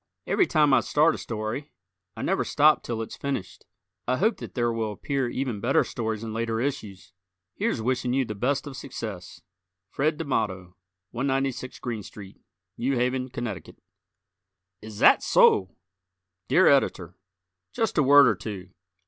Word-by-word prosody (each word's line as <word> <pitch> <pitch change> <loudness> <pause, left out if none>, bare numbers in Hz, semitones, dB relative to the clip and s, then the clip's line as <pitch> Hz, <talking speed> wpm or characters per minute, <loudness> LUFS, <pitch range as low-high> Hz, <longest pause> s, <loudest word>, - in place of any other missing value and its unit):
Every 375 - +2
time 150 -3 +3
I - - +6
start 155 +2 +2
a - - -6
story 115 +6 -5 0.5
I - - -5
never - - +1
stop 150 +1 +4
till 115 -1 -4
it's - - -9
finished. 140 -9 -5 0.4
I 130 +1 +1
hope 220 +4 +1
that - - -9
there 120 -2 0
will 110 -2 -2
appear 135 +3 -2
even 125 -4 -3
better - - +2
stories 110 -2 -4
in 110 -1 -5
later 115 0 -2
issues. 110 -9 -5 0.4
Here's 110 - -2
wishing 125 0 0
you 130 +1 +1
the 105 - -5
best 130 +8 -1
of 140 -2 -8
success, 110 -9 -7 0.5
Fred 150 +2 0
Damato, 95 - -2 0.4
196 135 0 -2
Greene 115 -3 -4
St., 100 0 -12 0.4
New 130 +3 0
Haven, 125 +1 -1
Conn. 120 -7 -5 1.2
Is 110 +1 -10
Zat - - +5
So! 95 -1 +4 0.7
Dear 185 - +4
Editor: 95 - +2 0.6
Just 225 -2 -1
a - - +6
word 140 0 +7
or 110 - +4
two. 95 -2 -8
120 Hz, 155 wpm, -26 LUFS, 110-140 Hz, 1.2 s, word